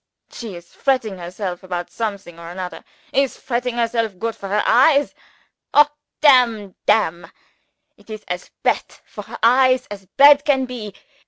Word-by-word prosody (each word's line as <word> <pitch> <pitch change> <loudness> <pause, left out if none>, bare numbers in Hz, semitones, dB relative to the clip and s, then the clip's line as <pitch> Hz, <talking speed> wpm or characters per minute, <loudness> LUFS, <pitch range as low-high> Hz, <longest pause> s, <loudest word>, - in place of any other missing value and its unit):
She 225 -6 -8
is 175 0 -14
fretting 230 -8 -1
herself 180 +1 -6
about 180 -2 -5
something 200 -6 -5
or 170 0 -9
anodder. 180 -1 -7 0.3
Is 275 -1 +1
fretting 245 -1 -3
herself 230 -4 -1
goot 225 +3 -3
for 200 -3 -8
her 210 +1 +1
eyes? 280 +5 +4 0.6
Ho 295 - +8 0.4
damn 235 -9 +4
damn! 175 -6 +1 0.7
it - - -23
is 215 -1 -8
as 180 0 -5
bad - - +2 0.2
for - - -9
her - - -9
eyes 255 +2 +4
as 195 -2 -9
bad 285 0 +7
can 270 -3 +1
be. 230 -5 -8
220 Hz, 155 wpm, -20 LUFS, 185-255 Hz, 0.7 s, Ho